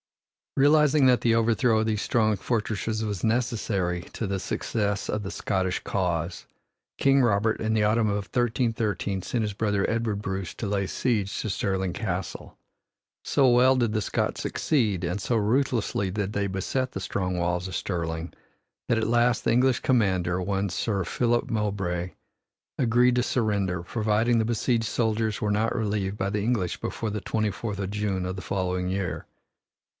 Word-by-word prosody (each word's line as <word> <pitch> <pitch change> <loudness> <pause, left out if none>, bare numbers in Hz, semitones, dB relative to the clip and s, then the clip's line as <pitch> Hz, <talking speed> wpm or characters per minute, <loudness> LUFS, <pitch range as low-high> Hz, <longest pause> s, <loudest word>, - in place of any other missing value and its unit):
Realizing 150 0 +5
that 125 -1 +5
the 115 -1 +3
overthrow 115 0 +3
of 110 - +1
these 110 -2 0
strong 110 -2 +2
fortresses 110 +1 -2
was 100 -4 -4
necessary 110 -6 0
to 115 - -3
the 95 0 -2
success 100 +1 -2
of 105 - -1
the 95 - -5
Scottish 95 -2 -1
cause, 85 -2 -2 0.5
King 135 0 +4
Robert 110 -2 +2
in 110 0 0
the 110 -1 +2
autumn 110 +1 +2
of 100 -1 -1
1313 115 -5 -1
sent 115 +5 -1
his 105 -1 -2
brother, 105 -1 0
Edward 115 -3 -1
Bruce, 95 -3 -4
to 110 - -4
lay 100 -1 0
siege 105 -5 -1
to 110 - -3
Stirling 95 -2 -1
Castle. 95 -4 -4 0.7
So 135 -2 +3
well 125 +2 +5
did 120 -4 +1
the 110 - +1
Scots - - -1
succeed 105 - 0
and 90 +4 -2
so 120 - 0
ruthlessly 110 -3 0
did 100 +1 -2
they 100 -1 0
beset 115 +7 -2
the 95 - -5
strong 90 0 -2
walls 90 +1 -1
of - - -5
Stirling 85 -2 -3 0.6
that 115 - +3
at 110 -1 0
last 120 0 +2
the - - +3
English 125 +1 +3
commander, 95 -7 +1
one 100 +1 -1
Sir 95 +2 -1
Philip 120 - 0
Mowbray, 100 -5 -1 0.7
agreed 125 0 +3
to 125 - +2
surrender, 100 -8 0
providing 110 +4 +1
the 110 - +1
besieged 115 0 0
soldiers 110 -1 0
were 105 - 0
not 110 +2 +1
relieved 105 -2 -1
by 95 0 -1
the 105 0 -1
English 105 -7 -1
before 110 -2 -3
the 105 -1 -3
twenty 110 -2 -1
fourth 105 +1 -5
of 95 -1 -3
June 100 -3 -1
of 90 0 -3
the 95 - -6
following 90 -1 -2
year. 90 -5 -3
105 Hz, 170 wpm, -26 LUFS, 95-115 Hz, 0.7 s, Realizing